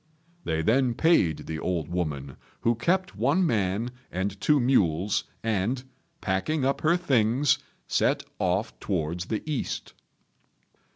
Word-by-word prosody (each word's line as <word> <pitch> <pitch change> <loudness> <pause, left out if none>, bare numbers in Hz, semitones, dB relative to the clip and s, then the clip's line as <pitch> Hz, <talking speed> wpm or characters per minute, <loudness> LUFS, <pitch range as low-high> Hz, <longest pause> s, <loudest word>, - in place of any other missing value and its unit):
They 80 -1 0
then 120 +5 +3
paid 115 - +3
the 80 -1 -4
old 85 -4 -1
woman, 75 -6 -3 0.3
who 115 - +3
kept 185 +11 0
one 140 - +2
man 110 - 0 0.2
and 95 +2 -3
two 150 -1 +4
mules, 100 -6 +2 0.2
and, 115 +4 0 0.4
packing 130 +10 0
up 135 0 0
her 165 +3 +4
things, 130 -4 +2 0.3
set - - +2 0.2
off 95 +4 0
towards 85 -2 -2
the 110 - -2
east. 150 -4 -3
110 Hz, 125 wpm, -27 LUFS, 90-135 Hz, 0.4 s, two